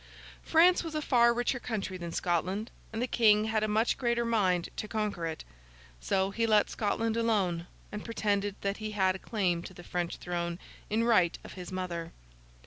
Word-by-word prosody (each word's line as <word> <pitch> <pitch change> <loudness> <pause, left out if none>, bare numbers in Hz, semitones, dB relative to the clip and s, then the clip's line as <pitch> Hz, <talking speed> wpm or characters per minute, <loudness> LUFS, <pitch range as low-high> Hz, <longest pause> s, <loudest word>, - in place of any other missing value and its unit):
France 350 +3 +5
was 325 -2 -6
a - - +1
far 240 -5 +4
richer 245 +1 0
country 210 -6 -3
than 170 -2 -5
Scotland, 185 +6 -1 0.2
and 225 +2 -2
the - - 0
King 215 -3 +4
had 220 -1 0
a - - +1
much 215 +2 +1
greater 235 -2 +1
mind 190 -7 +2
to 215 - -4
conquer 210 -6 -2
it. 160 -1 -5 0.6
So, 190 - 0
he 230 +3 0
let 215 -2 +4
Scotland 225 +1 0
alone, 195 -7 +1 0.2
and 210 0 -5
pretended 205 -3 -1
that 200 0 -1
he 215 -1 -5
had 190 -2 +3
a - - -7
claim 185 -7 0
to 185 - -10
the 175 - -11
French 175 -1 -3
throne 170 -1 -3 0.3
in 220 +2 +1
right 185 -8 +3
of - - -10
his 180 0 -8
mother. 175 -3 -4
210 Hz, 190 wpm, -30 LUFS, 180-230 Hz, 0.6 s, France